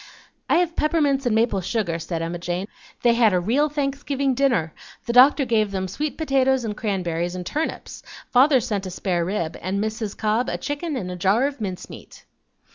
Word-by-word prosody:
"I - - +4
have 345 0 +1
peppermints 290 -4 +1
and 225 - +2
maple 220 -3 +2
sugar," 180 -4 -2
said 165 0 -4
Emma 170 +1 -4
Jane. 175 +3 -3 0.4
"They 240 -1 +5
had 230 -4 +4
a 180 - +3
real 255 +12 +1
Thanksgiving 280 -1 -1
dinner; 240 - +1 0.3
the 235 - -2
doctor 270 +3 +6
gave 220 -3 +1
them 190 -1 -3
sweet 300 +9 -4
potatoes 265 -4 +2
and 210 -2 -3
cranberries 175 -5 -2
and 180 -1 -5
turnips; 310 - -4 0.3
father 265 +2 +5
sent 205 -5 -3
a - - -4
spare 180 -1 -1
rib, 170 -3 -3
and 190 +3 -2
Mrs. 220 0 -3
Cobb 220 +3 0
a - - -2
chicken 290 +2 -4
and 185 -8 -4
a - - -5
jar 195 +8 +2
of 280 -4 -4
mince 185 -3 -4
meat." - - -13
220 Hz, 195 wpm, -23 LUFS, 185-275 Hz, 0.4 s, doctor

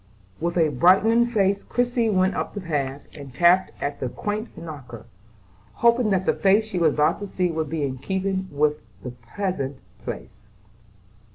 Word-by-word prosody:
With 170 +2 -2
a 160 -2 +4
brightening 195 - +4
face 200 -4 +1
Christie 245 -2 0
went 190 -1 +2
up - - -4
the - - -3
path, 145 -5 -3
and 140 -3 -9
tapped 175 +6 +4
at 140 0 -3
the 130 - -2
quaint 210 - -4
knocker, 135 -9 -9 0.7
hoping 235 -1 +3
that 190 -2 +1
the - - +3
face 200 +3 +3
she 195 -5 -3
was 160 -3 +3
about 150 0 +2
to 205 - -5
see 180 -2 -1
would 160 -2 -2
be 160 -2 -2
in 130 -2 -3
keeping 190 +5 -2
with 150 -1 +1 0.2
the 125 - -5
pleasant 135 - -4 0.3
place. - - -7
180 Hz, 170 wpm, -24 LUFS, 145-200 Hz, 0.7 s, a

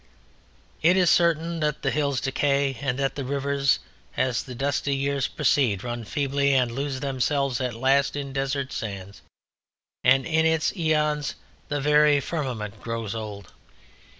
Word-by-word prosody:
It 175 +4 +4
is 180 -3 +4
certain 170 -1 +2
that 150 -1 -1
the 135 - +1
hills 140 -3 0
decay 140 0 +1
and 130 -2 -1
that 135 0 -1
rivers 140 0 +1 0.4
as 130 -2 +1
the 125 -2 -9
dusty 140 +1 0
years 140 0 0
proceed 110 -9 +1
run 120 -2 -4
feebly 140 +2 +1
and 125 -3 +2
lose 135 +1 -3
themselves 135 -1 0
at 125 -3 -2
last 135 +4 +2
in 140 -2 -5
desert 135 0 -2
sands; 100 -2 -6 0.8
and 135 +1 +4
in 160 0 +2
its 160 +3 +1
aeons 150 -4 0 0.3
the 145 - -2
very 150 0 +4
firmament 125 -9 -4
grows 115 -2 -4
old. 105 -4 -7
140 Hz, 145 wpm, -25 LUFS, 125-145 Hz, 0.8 s, It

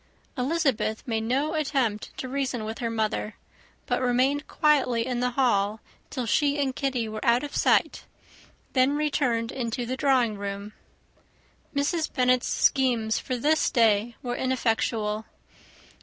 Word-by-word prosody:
Elizabeth 270 -5 0
made 225 -2 0
no 275 +7 0
attempt 270 -9 -1
to 260 - -4
reason 260 -4 -2
with 220 +1 -5
her 235 - -1
mother, 215 -1 -2 0.5
but - - -1
remained 260 +4 +1
quietly 260 -7 +2
in 250 -1 -2
the 250 0 +1
hall 215 -5 +2 0.3
till 255 - -3
she 285 +5 +2
and 270 -2 0
Kitty 255 -5 -1
were 215 0 -6
out 235 +2 +3
of 290 - -6
sight, - - +2 0.7
then 260 +2 +3
returned 260 -6 0
into 240 -1 -3
the 255 +2 -3
drawing 255 -7 +2
room. 200 +1 -5 1.0
Mrs. 310 +3 0
Bennet's 255 -2 +2
schemes 240 -5 +2
for 255 - -3
this 305 +6 +2
day 225 0 +2
were 245 -1 -2
ineffectual. 225 -4 -1
250 Hz, 140 wpm, -26 LUFS, 225-275 Hz, 1.0 s, out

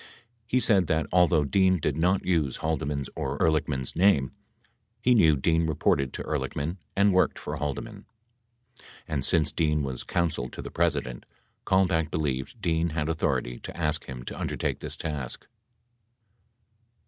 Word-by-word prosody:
He 130 +2 +2
said 100 -8 +3
that, 80 0 +1
although 85 -3 +4
Dean 95 +5 +3
did 75 -2 -1
not 90 +4 +1
use 80 -8 +1
Haldeman's 75 -3 -2
or 70 +1 -3
Ehrlichman's 75 -5 0
name, 85 -8 +3 0.7
he 125 +2 +3
knew 80 -10 +5
Dean 80 +3 +2
reported 70 -3 +1
to - - -5
Ehrlichman 80 +6 -3 0.2
and 100 0 +4
worked 95 - +3
for - - -5
Haldeman. 75 -2 -5 0.7
70 - - -18 0.2
And, 75 -4 -2
since 80 -3 +2
Dean 75 -2 +1
was 65 -2 -3
Counsel 80 -8 -1
to - - -8
the - - -7
President, 60 -1 -1 0.4
Kalmbach 90 -5 +2
believed 70 -5 -2
Dean 80 0 +1
had 75 0 -2
authority 60 -6 -1
to - - -9
ask 80 -2 0
him 65 -2 -7
to - - -6
undertake - - -2
this - - -6
task. 75 -5 -5
80 Hz, 150 wpm, -27 LUFS, 70-85 Hz, 0.7 s, knew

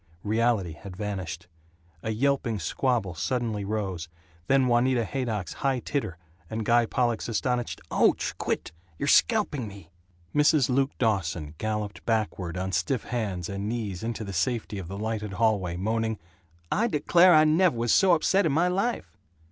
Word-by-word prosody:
Reality 110 -4 +1
had 95 +1 -10
vanished. 95 -5 -4 0.6
A - - -4
yelping 120 0 0
squabble 100 - -1
suddenly 110 +3 -2
rose, 95 -5 -3 0.4
then 135 -1 +4
Juanita 120 0 +2
Haydock's 110 -6 -3
high 135 -2 +2
titter, 120 - -3 0.3
and 110 -1 -3
Guy 120 0 +4
Pollock's 120 -2 0
astonished, 120 +2 -1
"Ouch! - - +2
Quit! - - -2 0.3
You're 140 - -2
scalping 150 - +3
me!" 100 -5 -12 0.4
Mrs. 150 -3 +4
Luke 135 +2 +1
Dawson 90 - -1
galloped 105 -5 -3
backward 100 -6 -1
on 95 +1 -2
stiff 95 +8 0
hands 100 -8 -3
and 100 +1 -4
knees 105 -6 -3
into 115 0 -3
the 100 -2 -6
safety 105 +2 -1
of 90 - -7
the 100 +2 -6
lighted 105 -1 -3
hallway, 95 -5 +1
moaning, 110 +3 -1 0.5
"I 225 +4 +2
declare, 175 -1 +5
I 155 - +7
nev' 160 +1 +4
was 115 0 +1
so 190 -2 +5
upset 190 +3 +2
in - - +1
my 165 +5 +2
life!" 200 - -2
110 Hz, 155 wpm, -27 LUFS, 100-130 Hz, 0.6 s, I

